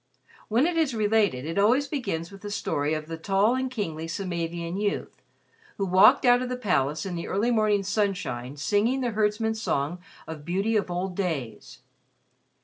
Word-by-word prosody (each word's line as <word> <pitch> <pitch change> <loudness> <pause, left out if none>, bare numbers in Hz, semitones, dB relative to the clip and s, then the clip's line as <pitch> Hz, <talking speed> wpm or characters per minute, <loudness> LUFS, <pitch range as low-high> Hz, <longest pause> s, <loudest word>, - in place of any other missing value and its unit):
When 235 +6 +3
it 345 0 0
is 300 -7 +1
related, 210 - +1
it 165 +5 -2
always 245 +8 +4
begins 195 - -3
with 195 0 -12
the 205 - -6
story 150 -6 -1
of 155 0 -4
the 165 +1 -7
tall 195 +6 +2
and 260 0 -1
kingly 165 -10 -4
Samavian 170 -1 -3
youth 205 -1 -3 0.6
who 195 - 0
walked 190 +7 +6
out 245 0 +5
of 255 - -3
the 250 - -3
palace 155 - 0
in 190 - -4
the 170 -1 -4
early 220 +5 +1
morning 215 -3 +2
sunshine 185 - -2
singing 215 - +1
the 245 -2 0
herdsmen's 220 +1 0
song 150 -2 -1 0.3
of 160 -2 -8
beauty 195 +7 0
of 205 -4 +1
old 180 +1 -3
days. 160 - -4
200 Hz, 175 wpm, -26 LUFS, 165-220 Hz, 0.6 s, walked